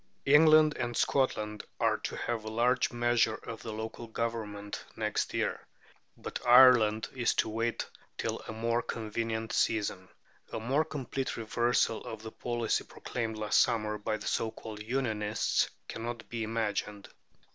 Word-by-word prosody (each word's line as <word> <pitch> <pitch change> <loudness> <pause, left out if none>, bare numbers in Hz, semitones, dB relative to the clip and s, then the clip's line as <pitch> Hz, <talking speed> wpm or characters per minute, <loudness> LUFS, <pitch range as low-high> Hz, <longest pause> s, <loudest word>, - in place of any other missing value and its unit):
England 155 +1 +7
and 120 -1 -2
Scotland 105 -6 0 0.2
are - - +3
to - - -4
have 115 -2 -2
a - - -8
large 125 +3 +2
measure 120 -2 +2
of 115 -1 -8
local 110 +1 -6
government 110 -3 -4
next 105 -2 -1
year; - - -2 0.5
but - - -5
Ireland 120 -4 +7
is 125 -3 +1
to - - +1
wait 115 +2 -1 0.3
till - - -2
a - - -4
more 115 +2 0
convenient 110 0 -3
season. 100 -4 0 0.4
A - - -3
more 135 +7 +1
complete 135 -3 -4
reversal 115 0 +1
of 110 -1 -7
the 110 - -7
policy 120 -1 -1
proclaimed 115 -3 -4
last 105 -1 +2
summer 105 -1 0
by 110 +1 -1
the 105 - -9
so 115 - 0
called 110 -1 -9
Unionists 110 -3 0 0.2
cannot 115 0 -5
be 115 -1 -4
imagined. 105 -2 -2
115 Hz, 145 wpm, -31 LUFS, 110-120 Hz, 0.5 s, England